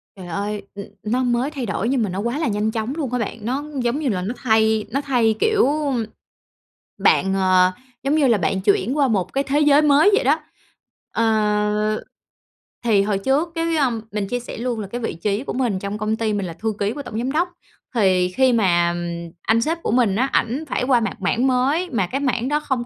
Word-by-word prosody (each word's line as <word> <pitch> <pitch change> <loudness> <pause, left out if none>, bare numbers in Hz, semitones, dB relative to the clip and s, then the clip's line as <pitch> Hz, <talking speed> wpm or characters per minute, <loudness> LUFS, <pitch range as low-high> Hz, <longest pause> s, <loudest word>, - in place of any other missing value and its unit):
Trời 185 -2 -10
ơi, 200 +4 -3
ừm, 200 - -6 0.2
nó 245 +4 0
mới 245 +4 0
thay 265 -5 -4
đổi 210 +3 -2
nhưng 260 -4 +1
mà 205 - -1
nó 185 +2 -4
quá 235 +7 -2
là 320 - 0
nhanh 210 +1 0
chóng 225 +4 -3
luôn 285 -7 -3
á 250 - 0
bạn. 230 - -3
Nó 265 +4 -1 0.2
giống 240 +5 0
như 285 -5 -1
là 185 -4 -1
nó 205 +6 -3
thay 220 -2 +2
nó 275 +3 0
thay, 240 -6 +2
kiểu 440 -6 +3 1.3
bạn, 195 - +3
ờ, 185 -1 +4 0.3
giống 280 +3 +1
như 290 -4 +3
là 230 -3 +4
bạn 190 +2 -1
chuyển 210 +7 +1
qua 280 -2 +3
một 195 -6 -1
cái 275 +1 +1
thế 285 +2 0
giới 295 0 +5
mới 300 +6 +5
vậy - - +1
đó. 290 +5 +3 0.7
Ờ, 210 -1 +1 0.8
thì 210 -4 +4
hồi 205 -1 0
trước, 285 - +1
cái, 330 0 0
ơm 245 -6 +1
mình 205 -1 -2
chia 245 - -2
sẻ 245 - -8
luôn 240 -1 -2
là 200 - -5
cái 240 +4 -5
vị - - -2
trí 205 +7 -2
của - - -4
mình 240 -7 0
trong 200 +2 -4
công 215 +1 -1
ty 220 -1 -1
mình 200 -2 -1
là 170 - -5
thư 220 +4 -3
ký 205 +1 0
của 290 - -6
tổng 220 - -6
giám 250 +4 -1
đốc. 345 +4 +1 0.5
Thì 185 -4 +3
khi 255 +6 +3
mà 175 -5 +2 0.5
anh 225 +1 +2
sếp 330 +6 -1
của - - -1
mình 230 -5 +2
á, 260 +5 +2
ảnh 255 +7 0
phải - - -1
qua 250 -2 +3
mạng 220 -3 -2
mảng 235 +7 +1
mới 275 +8 +1
mà 200 -7 0
cái 275 +8 -3
mảng 255 -2 0
đó 300 +1 +1
không 260 -5 -2
230 Hz, 230 wpm, -21 LUFS, 205-270 Hz, 1.3 s, giới